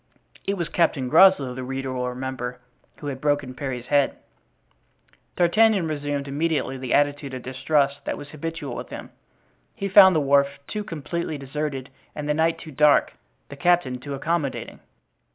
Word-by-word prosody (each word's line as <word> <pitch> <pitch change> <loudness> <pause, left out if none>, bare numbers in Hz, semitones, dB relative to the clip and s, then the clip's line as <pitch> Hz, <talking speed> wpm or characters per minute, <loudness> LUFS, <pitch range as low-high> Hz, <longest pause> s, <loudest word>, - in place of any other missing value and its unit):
It 200 - +1
was 170 -4 -3
Captain 150 -7 +1
Groslow, 160 -5 +6
the 130 +1 -6
reader 135 0 -4
will 125 0 -2
remember, 125 -1 -5 0.4
who - - -10
had 135 -2 -4
broken 145 -3 0
Parry's 125 -2 -5
head. 140 0 +2 1.2
D'Artagnan 190 +1 +3
resumed 145 -2 -3
immediately 145 -1 -1
the 130 -1 -6
attitude 145 -2 0
of 130 - -7
distrust 140 +2 0
that - - -2
was 145 - -9
habitual 155 -3 -5
with - - -7
him. - - -8 0.6
He 195 - -3
found 190 -1 +8
the - - +4
wharf 140 0 +2
too 210 +6 -4
completely 165 -2 -4
deserted, 140 -1 -4 0.2
the 150 0 -1
night 160 +2 +1
too 155 - -10
dark, 150 +1 +4 0.4
the 140 - -8
captain 155 -6 +2
too 140 +2 -6
accommodating. 150 0 -2
145 Hz, 155 wpm, -24 LUFS, 135-160 Hz, 1.2 s, found